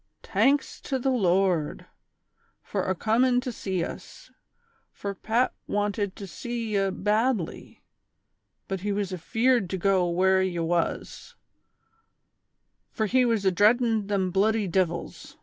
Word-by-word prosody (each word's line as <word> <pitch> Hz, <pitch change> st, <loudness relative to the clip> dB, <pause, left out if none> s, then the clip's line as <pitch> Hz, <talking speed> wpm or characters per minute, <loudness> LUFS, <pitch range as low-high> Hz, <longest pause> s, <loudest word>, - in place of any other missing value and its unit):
"Tanks 260 Hz, +8 st, +1 dB
to 270 Hz, -, -1 dB
the 265 Hz, +1 st, 0 dB
Lord! 185 Hz, -, +1 dB, 0.8 s
fur -, -, -2 dB
acomin' 235 Hz, +7 st, +2 dB
to 250 Hz, -, -4 dB
sea 190 Hz, -6 st, -3 dB
us, -, -, -9 dB, 0.6 s
fur 200 Hz, 0 st, -5 dB
Pat 230 Hz, +5 st, 0 dB
"wanted 205 Hz, -1 st, -1 dB
to 200 Hz, -, -8 dB
sea 230 Hz, +5 st, -5 dB
ye 195 Hz, -1 st, +2 dB
badly; 210 Hz, 0 st, -1 dB, 0.8 s
but 195 Hz, -1 st, -3 dB
he 205 Hz, +3 st, -2 dB
was 200 Hz, -2 st, -2 dB
afeard 225 Hz, +3 st, +1 dB
to 190 Hz, -, -2 dB
go 185 Hz, -1 st, +2 dB
where 190 Hz, +2 st, +3 dB
ye 185 Hz, -2 st, -1 dB
was, 170 Hz, 0 st, -2 dB, 1.5 s
fur 220 Hz, -, -2 dB
he 255 Hz, +4 st, +3 dB
was 225 Hz, -4 st, 0 dB
adreadin' 215 Hz, +3 st, +3 dB
them 195 Hz, -3 st, 0 dB
bluddy 210 Hz, +2 st, +2 dB
divils 175 Hz, -1 st, -2 dB
200 Hz, 125 wpm, -26 LUFS, 185-225 Hz, 1.5 s, where